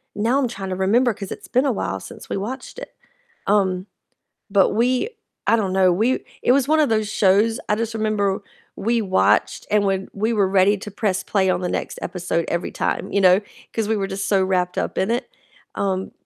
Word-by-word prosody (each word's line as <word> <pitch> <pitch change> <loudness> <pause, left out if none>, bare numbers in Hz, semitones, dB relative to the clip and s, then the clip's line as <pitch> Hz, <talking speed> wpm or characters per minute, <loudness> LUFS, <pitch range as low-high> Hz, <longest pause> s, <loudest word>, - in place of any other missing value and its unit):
Now 235 +6 +1
I'm 260 - +1
trying 195 -5 -6
to 185 - -2
remember, 220 +6 +2
'cause 195 -1 -8
it's - - -8
been 255 +3 +2
a 275 - +2
while 95 - -2
since - - -11
we - - -3
watched 240 +8 -6
it. - - -10 0.5
Um, 190 -2 +2 0.6
but 195 -1 +4
we 250 - +1 0.4
I 230 - +5
don't 195 -4 -1
know, 185 -1 +4
we 225 +8 +1 0.2
It - - +3
was 275 -1 +2
one 315 - +4
of 300 - +4
those 215 -2 +1
shows, 210 +3 +3
I 210 - +3
just 225 +1 -3
remember 210 -3 0 0.4
we 230 +3 +1
watched, 190 -3 +2
and 210 -1 +3
when 195 0 0
we 215 +3 0
were 205 -3 +2
ready 195 +2 +3
to 205 +1 -8
press 195 -2 -1
play 190 -2 +1
on 180 0 +1
the 180 - -1
next - - -3
episode 175 -2 -2
every 170 +1 -2
time, - - -2
you 200 - +2
know? 185 +2 +6 0.3
'Cause 225 -2 -1
we 220 - +1
were 195 - -1
just 195 +1 -3
so 195 -2 +3
wrapped 180 -1 0
up - - -2
in 190 - +1
it. 245 +3 -2 0.5
Um, 190 -1 -1
200 Hz, 215 wpm, -22 LUFS, 190-225 Hz, 0.6 s, know